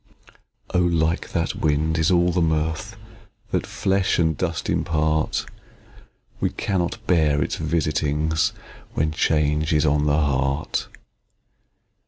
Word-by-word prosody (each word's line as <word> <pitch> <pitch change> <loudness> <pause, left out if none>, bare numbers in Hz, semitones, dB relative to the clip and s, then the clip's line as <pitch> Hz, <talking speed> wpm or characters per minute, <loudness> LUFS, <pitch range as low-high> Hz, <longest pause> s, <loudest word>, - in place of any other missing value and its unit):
Oh! 90 - +3
like 85 -1 0
that 85 -1 -1
wind, 80 +1 0
is 80 - +3
all 90 -1 +3
the 90 +1 +1
mirth 80 0 -1 0.5
That - - -1
flesh 95 -1 +1
and 80 -2 +2
dust 85 +1 -3
impart: 80 0 0 0.9
We - - +1
cannot 90 -3 -2
bear 75 -5 +3
its - - -3
visitings, 75 -1 0 0.4
When 75 +1 +1
change 75 0 +1
is 75 0 +3
on 75 0 +2
the 75 0 +3
heart. 70 0 0
80 Hz, 120 wpm, -23 LUFS, 75-85 Hz, 0.9 s, Oh